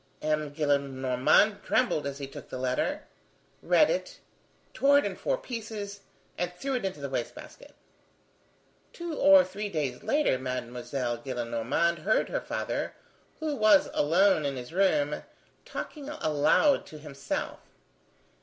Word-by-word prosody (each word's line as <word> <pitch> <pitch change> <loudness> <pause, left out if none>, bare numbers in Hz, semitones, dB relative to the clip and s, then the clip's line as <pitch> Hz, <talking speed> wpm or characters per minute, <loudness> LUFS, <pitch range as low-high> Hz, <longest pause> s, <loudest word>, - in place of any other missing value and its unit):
M. 155 -1 0
Gillenormand 140 +5 +2
trembled 220 - +1
as 140 -1 -5
he 140 - -5
took 135 - -11
the - - -5
letter, 130 0 -1 0.6
read - - +4
it, - - -2 0.6
tore 280 +1 +4
it 285 - +2
in - - -3
four - - -1
pieces, 220 - -6 0.4
and 175 0 -1
threw 270 +9 -4
it 250 - -1
into 185 -6 -3
the 140 - -4
waste 130 -3 -3
basket. - - -13 1.2
Two 345 -1 -5
or 195 -6 +7
three 200 +3 -5
days 145 -8 -3
later, 290 - +1
Mademoiselle 125 -1 -3
Gillenormand 120 +7 -1
heard 210 +8 +1
her - - -2
father, - - -3 0.4
who 310 -2 -2
was 215 -5 +5
alone 170 +2 +3
in 140 -1 -2
his 125 +4 -8
room, 155 -6 +2 0.4
talking 295 -2 -6
aloud 275 - +2
to 155 - -10
himself. 145 -2 -5
155 Hz, 135 wpm, -28 LUFS, 135-215 Hz, 1.2 s, or